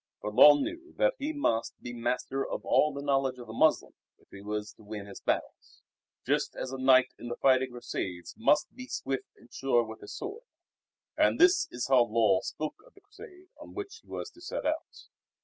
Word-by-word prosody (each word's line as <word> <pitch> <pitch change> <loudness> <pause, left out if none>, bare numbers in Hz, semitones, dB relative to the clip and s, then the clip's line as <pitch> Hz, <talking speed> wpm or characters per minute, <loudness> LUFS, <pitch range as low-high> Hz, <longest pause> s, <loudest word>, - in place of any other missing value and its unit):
For 105 - -5
Lull 145 +6 +9
knew 340 +3 -5
that - - +3
he 295 - -2
must 200 - -1
be 120 - -7
master 125 +3 -2
of - - -5
all 150 - +3
the 140 0 -6
knowledge 135 -2 +1
of 120 - -9
the 110 - -9
Moslem 155 +6 +2 0.2
if - - -29
he 100 - -10
was 105 +1 -4
to - - -21
win 105 -1 -7
his 100 - -11
battles; - - -3 0.4
just - - 0
as 130 - -5
a 135 - -5
knight 130 -1 +5
in 120 - -7
the 120 - -4
fighting 130 -1 +3
Crusades 95 -7 -5
must 150 +7 +2
be 255 +1 -9
swift 135 - -3
and 120 - -21
sure 130 -3 +2
with 110 -1 -9
his 105 - -9
sword. 410 +3 -6 0.7
And - - +3
this 360 +2 +5
is 120 0 -4
how 130 -3 +5
Lull 110 -4 +3
spoke 155 0 -5
of - - -23
the 395 - -19
Crusade 370 -2 -15
on 300 - -12
which 400 +3 -6
he - - -30
was - - -6
to 345 - -19
set 355 - -5
out. 310 +1 -3
135 Hz, 210 wpm, -29 LUFS, -, 0.7 s, Lull